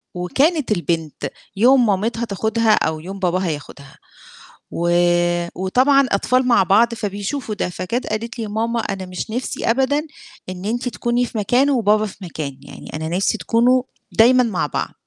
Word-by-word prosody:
وكانت 270 - +1
البنت 165 -6 -2 0.3
يوم 250 +4 +5
مامتها 225 +3 0
تاخدها 220 +2 +1
أو 160 -6 0
يوم 195 +4 -8
باباها 185 0 0
ياخدها، 140 -2 -8 0.7
و 170 +1 -1 0.7
وطبعًا 260 +9 +3
أطفال 255 +6 +2
مع 235 -5 +5
بعض 225 +5 +3
فبيشوفوا 210 +3 -4
ده، - - -2
فجات 185 +8 -3
قالت 230 +2 -4
لي: - - -2
"يا 210 - -7
ماما، 230 +2 -1
أنا 195 -3 -4
مش 180 +4 -6
نفْسي 245 -1 -3
أبدًا 285 +5 0 0.4
إن 185 +1 -7
أنتِ 240 +3 -1
تكوني 240 +1 0
في 230 - -7
مكان 245 +7 +2
وبابا 215 -5 +2
في 200 - -9
مكان، 155 -6 -6
يعني 140 - -12
أنا 160 +1 -4
نفْسي 195 +3 +1
تكونوا 250 +2 +3 0.3
دايمًا 250 +3 +5
مع 210 -9 -1
بعض.". - - -3
220 Hz, 160 wpm, -20 LUFS, 185-245 Hz, 0.7 s, يوم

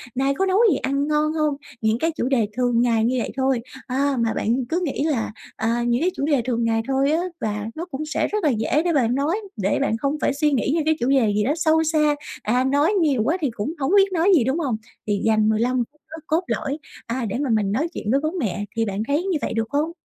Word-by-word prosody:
Nay 270 +2 +1
có 385 - +1
nấu 380 0 +2
gì - - +2
ăn 275 +2 -1
ngon 305 0 +1
hông?" 305 -2 +1 0.3
Những 220 +1 +1
cái 325 +1 +1
chủ 280 -6 -2
đề 240 -6 +2
thường 245 -2 +2
ngày 230 -2 +2
như 255 +2 +1
vậy - - -3
thôi, 265 -2 +1 0.3
à, 275 +2 0
mà 230 -1 +1
bạn 240 +4 0
cứ 345 +3 0
nghĩ 280 - -2
là, 290 -8 0 0.2
à, 230 +2 0
những 240 +2 +1
cái 355 - +3
chủ 280 - -1
đề 290 -4 +2
thường 235 -2 0
ngày 225 0 +1
thôi 270 +2 +2
á, 320 - +2 0.2
và 210 -1 -2
nó 335 +3 -4
cũng 290 +2 -4
sẽ 310 - -1
rất 425 0 -2
là 305 - +4
dễ 255 +6 +1
để 345 - +2
bạn 250 -4 +2
nói, 295 +8 0 0.2
để 200 -1 0
bạn 225 -5 +1
không 280 +4 -1
phải - - +2
suy 300 +1 +1
nghĩ 265 -1 +1
những 315 -2 0
cái 315 - +3
chủ 245 - 0
đề 245 -6 +3
gì 210 - +2
đó 270 +7 +1
sâu 320 -1 +3
xa, 305 -2 +2 0.3
à, 245 +4 +2
nói 285 +8 +2
nhiều 280 -8 +2
quá 320 +8 +1
thì 285 - +1
cũng 225 +7 -4
hổng 270 +3 0
biết 390 -1 +5
nói 345 +2 +2
gì, 270 - +4
đúng 265 +7 0
hông? 265 -9 -1 0.3
Thì 205 -1 0
dành 215 -1 +3
15 240 +3 +1
phút 300 0 -34 0.3
cốt 325 +4 +1
lõi, 285 -2 -2 0.3
à, 235 +1 -2
để 200 - -2
mà 280 -3 -1
mình 210 -3 +1
nói 280 +11 0
chuyện 215 - -3
với 275 - +3
bố 310 - 0
mẹ. 205 - -2
Thì 225 0 +1
bạn 200 +1 -2
thấy 295 +5 +1
như 375 -5 0
vậy - - -2
được 225 -1 -1
hông? 295 +3 0
270 Hz, 265 wpm, -22 LUFS, 230-305 Hz, 0.3 s, biết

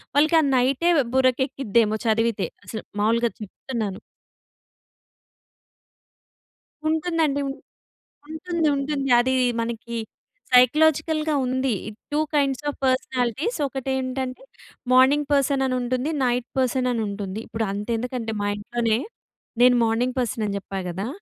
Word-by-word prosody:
వాళ్ళకి 310 +3 +4
ఆ - - 0
నైటే 265 +7 +2 0.3
బుర్రకు 260 0 +3
ఎక్కిద్దేమో 230 -5 +1
చదివితే 225 -2 +1 0.2
అసలు 220 +3 -6 0.2
మావూలుగా 230 +2 +2
చెప్తున్నాను. 210 -1 -5 2.9
ఉంటుందండి. 315 -3 0
ఉం - - -3 0.8
ఉంటుంది. 330 0 -1
ఉంటుంది. 275 -1 -2
అది 260 +2 +1 0.3
మనకి 235 0 -4 0.6
సైకలాజికల్‌గా 310 +4 +4
ఉంది, 260 -1 0 0.4
టూ 295 - +1
కైండ్స్ 280 -1 +1
ఆఫ్ - - -6
పర్సనాలిటీస్ 260 - 0
ఒకటేంటంటే 265 - -3 0.5
మార్నింగ్ 275 +3 +5
పర్సన్ 275 -1 +2
అనుంటుంది, 255 +2 -1
నైట్ 245 0 0
పర్సన్ 255 0 +1
అనుంటుంది. 205 -2 -3
ఇప్పుడు 220 0 -3
అంత 205 +2 -4
ఎందుకంటే 245 -1 -4
మా 205 - 0
ఇంట్లోనే 230 +1 0 0.6
నేను 250 0 +7
మార్నింగ్ 240 +3 0
పర్సన్ 230 -2 -1
అని 200 -1 -2
చెప్పా 195 0 -7
కదా! 190 +6 -4
255 Hz, 110 wpm, -24 LUFS, 230-275 Hz, 2.9 s, నేను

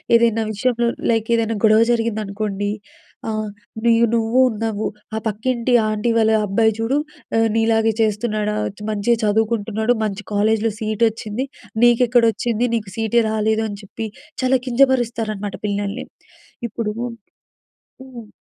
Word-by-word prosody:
ఏదైనా 230 -1 +3
విషయంలో 235 +2 0 0.2
లైక్ 225 -1 0
ఏదైనా 225 -1 0
గొడవ 215 +1 +6
జరిగిందనుకోండి. 210 -3 -1 0.6
ఆహ్, 215 0 -2 0.4
నూయ్ 230 -1 +4
నువ్వూ 230 +2 +2
ఉన్నావూ, 220 -1 -3 0.3
ఆ - - -1
పక్కింటి 235 +3 -1 0.2
ఆంటీ 215 +2 -1
వాళ్ళ 220 -1 +4
అబ్బాయి 220 +3 +2
చూడు, 230 +5 +1 0.4
ఆహ్, 225 0 +4
నీలాగే 225 0 +2
చేస్తున్నాడా? 210 -1 0 0.3
మంచిగా 215 +3 +1
చదువుకుంటున్నాడు 220 +1 +1
మంచి 210 -1 -3
కాలేజ్‌‌లో 220 +2 +2
సీటొచ్చింది. 220 +2 -1 0.4
నీకెక్కడొచ్చింది. 240 -1 +3
నీకు 210 -4 -4
సీ‌‌టే 225 +1 +2
రాలేదు. 220 0 +1
అని 200 -1 -7
చెప్పి 220 +3 -6 0.3
చాలా 260 +1 +3
కింజపరుస్తారనమాట 235 -5 +1
పిల్లల్ని. 205 +3 -3 0.6
ఇప్పుడు 220 -1 -3 1.1
హ్మ్. 250 -4 -10
225 Hz, 115 wpm, -20 LUFS, 215-235 Hz, 1.1 s, గొడవ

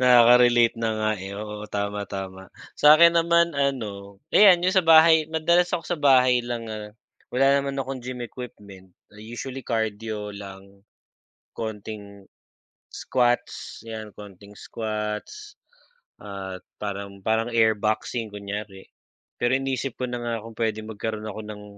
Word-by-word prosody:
Nakaka-relate 120 -1 +6
na 115 - 0
nga, 110 0 +1
eh 95 +1 -7
oo, 105 0 -6
tama, 100 0 -2
tama. 95 -1 -7 0.2
Sa'kin 160 +3 +7
naman 170 -1 +3
ano, 105 -8 -3 0.2
ayan 185 -4 +7
yung 185 - +2
sa 190 - +5
bahay, 160 -1 +6
madalas 170 +2 +2
ako 165 - -1
sa 175 - -2
bahay 130 -3 +4
lang 120 -1 -5
nga 105 -1 -7 0.4
wala 135 +2 +2
naman 140 0 -3
akong 135 -1 -4
gym 125 0 -6
equipment. 100 -7 -10 0.2
Ah, 105 - -17
usually 120 +4 -7
cardio 110 -2 -3
lang. 100 0 -12 0.7
Konting 105 -2 -7 0.7
squats 120 -1 -1
yan, 110 -1 -7
konting 100 0 -12
squats 110 - -5 0.7
at 95 -2 -7 0.2
parang 100 -1 -5
parang 110 +2 +1
air 110 -1 +4
boxing 110 +2 -2
kunyari, 100 -1 -7 0.6
pero 125 +2 +3
iniisip 135 -1 -3
ko 130 - -2
na 120 -1 -4
nga 115 -2 -3
kung 115 - -10
puwedeng 110 -1 -2
magkaroon 110 0 -5
ako 105 +2 -6
ng 105 -1 -8
110 Hz, 140 wpm, -24 LUFS, 105-130 Hz, 0.7 s, Sa'kin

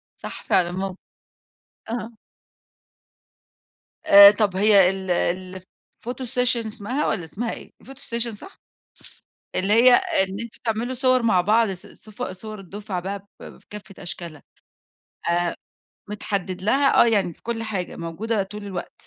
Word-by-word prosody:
صح - - -9
فعلًا 175 -2 +2
مو 190 0 -4 0.9
آه. 235 0 -4 2.0
آآ 200 0 +10
طب 205 -3 0
هي 200 -2 +6
ال 190 -1 -5 0.5
الphoto 240 +7 -10
session 245 -1 +2
اسمها 220 +7 -3
والّا 175 - -1
اسمها 225 +8 -4
إيه؟ - - -10
الphoto 270 +1 -13
session 235 -1 0
صح؟ 380 - -12 1.0
ف - - -2
اللي 195 +3 +1
هي 245 +2 +7
إن 190 -1 +1
أنتم 235 -1 -8
تعملوا 230 +3 -2
صور 255 -1 +2
مع 205 -6 +3
بعض 220 +4 +3
ص 185 -1 -8
صف 215 -1 -11
صور 215 +3 -6
الدفعة 195 0 -6
بقى 195 +2 -4 0.2
ب - - -11
في - - -27
كافة 195 -2 -10
أشكالها 170 -4 -5 0.9
آآ، 175 0 0 0.5
متحدد 195 -3 -4
لها 270 +7 +3
آه، - - +2
يعني 200 -7 +1
في - - -30
كل 225 -1 -3
حاجة 195 -5 -4
موجودة 195 +6 -2
طول 210 +2 -9
الوقت. 195 -2 -6
205 Hz, 145 wpm, -23 LUFS, 190-230 Hz, 2.0 s, آآ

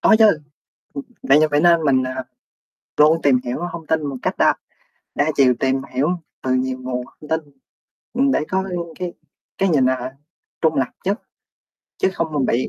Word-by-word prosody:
Có 220 - +6
chứ. 220 - +7
Ừm, 160 -8 +2 0.8
vậy 140 +2 +5
giờ 155 - +4
phải 145 - +3
nên 170 -1 +5
mình, 135 -3 +3
à, 130 0 -4 0.7
luôn 155 +2 +5
tìm 135 -3 +4
hiểu 120 0 -3
thông 165 -2 -7
tin 160 -1 0
một 140 -2 -4
cách - - 0
đa - - +5 0.6
đa 145 +2 +2
chiều, 130 -3 +5
tìm 135 0 +1
hiểu 135 +4 +2 0.3
từ 130 -1 +1
nhiều 130 0 -1
nguồn 125 -1 -4
thông 150 - -15
tin. 160 0 +1 0.7
Ừm, 270 +2 +3
để - - +2
có, 190 0 0
ừ, 180 - -3 0.2
cái 180 -2 -3 0.5
cái 195 - +2
nhìn, 140 -7 +3
à 130 - +1
ha, 130 +1 -5 0.5
trung 160 -1 +3
lập 135 -2 +1 0.2
nhất, 200 +4 -1 0.8
chứ 190 - +2
không 160 -2 -2
mình 140 -4 +1
bị 120 +2 0
145 Hz, 200 wpm, -21 LUFS, 130-165 Hz, 0.8 s, chứ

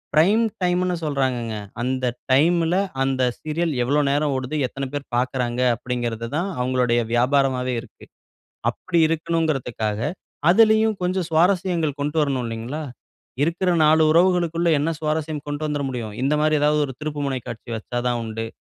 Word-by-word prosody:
Prime 195 +9 +5 0.2
டைம்னு 180 0 +1
சொல்றாங்கங்க. 130 -6 -1 0.3
அந்த 130 +1 -1 0.3
டைம்ல, 165 +4 +3 0.3
அந்த 135 -1 0 0.2
சீரியல் 155 +1 -2
எவ்வளோ 145 +5 +2
நேரம் 145 0 +1
ஓடுது, 130 +3 -3
எத்தன 135 +1 -5
பேர் 145 -1 -4
பார்க்கிறாங்க, 125 -1 -1 0.2
அப்பிடிங்கிறது 120 -1 -3
தான், 185 +4 -1
அவுங்களுடைய 125 -1 +1
வியாபாரமாவே 130 0 +2
இருக்கு. 125 - -16 0.7
அப்பிடி 175 -3 -1
இருக்கணும்ங்கிறதுக்காக, 155 -10 -1 0.5
அதிலேயும் 220 +2 +5
கொஞ்சம் 180 0 0
சுவாரஸ்யங்கள் 170 -3 +1
கொண்டு 145 +2 -2
வரணும் 135 -4 -1
இல்லேங்களா. 115 +7 -5 0.6
இருக்குற 175 +4 +1
நாலு 155 +1 +5
உறவுகளுக்குள்ள 170 -1 +3
என்ன 150 +3 0
சுவாரஸ்யம் 155 -1 -2
கொண்டு 145 +1 -4
வந்துற 150 -1 -2
முடியும்? 115 -5 -5
இந்தமாரி, 150 +3 +2
ஏதாவது 150 0 +3
ஒரு 135 - -7
திருப்புமுனை 145 -3 -2
காட்சி 115 +1 -8
வைச்சா 120 +2 -5
தான் 120 -1 0
உண்டு. 115 0 -4
145 Hz, 135 wpm, -22 LUFS, 125-165 Hz, 0.7 s, Prime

